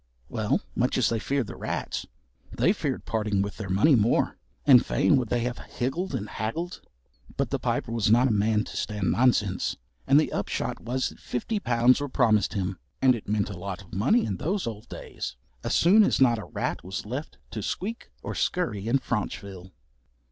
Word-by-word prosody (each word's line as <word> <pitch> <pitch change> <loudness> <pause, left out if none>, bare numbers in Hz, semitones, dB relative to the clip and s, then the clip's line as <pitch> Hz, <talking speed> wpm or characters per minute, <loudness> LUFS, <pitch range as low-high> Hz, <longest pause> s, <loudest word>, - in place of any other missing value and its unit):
Well, 110 -3 0
much 125 +1 +1
as 125 -5 +3
they 115 - 0
feared 140 +2 0
the - - -8
rats, - - -3 0.4
they - - +3
feared - - -3
parting 105 -3 0
with 100 - -5
their 105 -3 -5
money 105 +12 +4
more, 115 -2 +2 0.3
and 130 -4 +8
fain - - +3
would 125 -4 -1
they 120 - +1
have 120 0 -2
higgled 140 +6 -3
and 105 -4 -3
haggled. 160 - -4 0.6
But - - -1
the - - 0
Piper - - -1
was 115 -3 +1
not 120 +4 +5
a - - +1
man 105 +1 +2
to - - -9
stand 105 -3 -1
nonsense, 115 -6 +2 0.3
and 140 +2 +7
the 155 - 0
upshot - - -2
was 125 +3 -1
that - - -15
fifty 205 - -2
pounds 125 -3 +3
were 145 - -3
promised 110 -5 +2
him 95 -2 -2 0.2
(and 130 -1 +5
it 115 - -6
meant 105 -1 0
a 90 - -7
lot 95 +1 -5
of 95 - -19
money 130 - +3
in 95 - -2
those 185 - -1
old 110 -2 -6
days) - - -6 0.3
as 115 - 0
soon 195 +6 +6
as - - +2
not 120 -4 +4
a 105 - -7
rat - - -3
was 95 +3 -5
left 130 +8 -5
to 110 - -4
squeak 215 - -4
or - - -4
scurry 115 - -1
in 125 +4 +4
Franchville. 100 -6 -4
115 Hz, 200 wpm, -27 LUFS, 105-130 Hz, 0.6 s, and